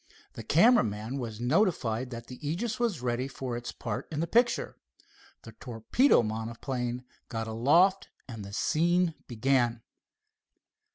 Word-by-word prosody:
The -, -, -7 dB
camera 215 Hz, -, +5 dB
man 110 Hz, +5 st, -4 dB
was 115 Hz, -4 st, -5 dB
notified 130 Hz, -, +1 dB
that 115 Hz, -1 st, -7 dB
the 125 Hz, 0 st, -10 dB
Aegis 185 Hz, -, -2 dB
was 220 Hz, -, -1 dB
ready 125 Hz, +1 st, -1 dB
for 130 Hz, -2 st, -5 dB
its 120 Hz, 0 st, -5 dB
part 110 Hz, -3 st, -5 dB
in 150 Hz, -, -3 dB
the 165 Hz, -, +1 dB
picture. 235 Hz, +6 st, +1 dB, 0.7 s
The 115 Hz, -, -10 dB
torpedo 115 Hz, -, +2 dB
monoplane 120 Hz, +3 st, -3 dB, 0.3 s
got 115 Hz, -2 st, -3 dB
aloft, 165 Hz, -, +3 dB, 0.2 s
and 115 Hz, -5 st, -7 dB
the 100 Hz, -, -9 dB
scene 170 Hz, -, +1 dB
began. 120 Hz, -1 st, +1 dB
125 Hz, 135 wpm, -29 LUFS, 115-165 Hz, 0.7 s, camera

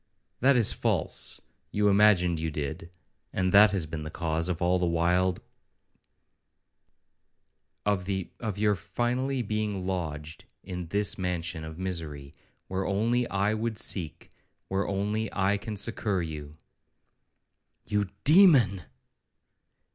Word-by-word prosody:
'—'That 135 Hz, +2 st, +4 dB
is 120 Hz, -4 st, +5 dB
false; -, -, -1 dB, 0.3 s
you 105 Hz, 0 st, +2 dB
imagined 100 Hz, -5 st, +4 dB
you 80 Hz, 0 st, -2 dB
did, 75 Hz, +2 st, -5 dB, 0.4 s
and 95 Hz, -1 st, 0 dB
that 105 Hz, +2 st, +8 dB
has 95 Hz, -5 st, -1 dB
been 80 Hz, 0 st, -6 dB
the 75 Hz, -, -6 dB
cause 80 Hz, +1 st, -1 dB
of 85 Hz, -2 st, -2 dB
all 90 Hz, +1 st, +2 dB
the 90 Hz, -, +1 dB
wild 90 Hz, +2 st, +1 dB, 2.4 s
of 100 Hz, -3 st, 0 dB
the 95 Hz, -2 st, -3 dB
of 110 Hz, -5 st, -4 dB
your 105 Hz, 0 st, +3 dB
finally 125 Hz, +6 st, -2 dB
being 105 Hz, -3 st, -2 dB
lodged 80 Hz, -4 st, -4 dB, 0.2 s
in 90 Hz, -2 st, -6 dB
this 100 Hz, +3 st, -1 dB
mansion 85 Hz, -3 st, -3 dB
of 80 Hz, 0 st, -8 dB
misery, 80 Hz, -7 st, -5 dB, 0.3 s
where 95 Hz, 0 st, -2 dB
only 115 Hz, +5 st, +1 dB
I 100 Hz, +2 st, +1 dB
would 110 Hz, 0 st, -2 dB
seek, 90 Hz, -8 st, 0 dB, 0.4 s
where 95 Hz, +1 st, -1 dB
only 105 Hz, +2 st, -2 dB
I 100 Hz, +1 st, +1 dB
can 110 Hz, +1 st, -6 dB
succour 100 Hz, -3 st, -1 dB
you.' 75 Hz, -1 st, -7 dB, 1.3 s
'You, 105 Hz, -2 st, -1 dB
demon!' 145 Hz, -, +6 dB
95 Hz, 125 wpm, -28 LUFS, 85-105 Hz, 2.4 s, that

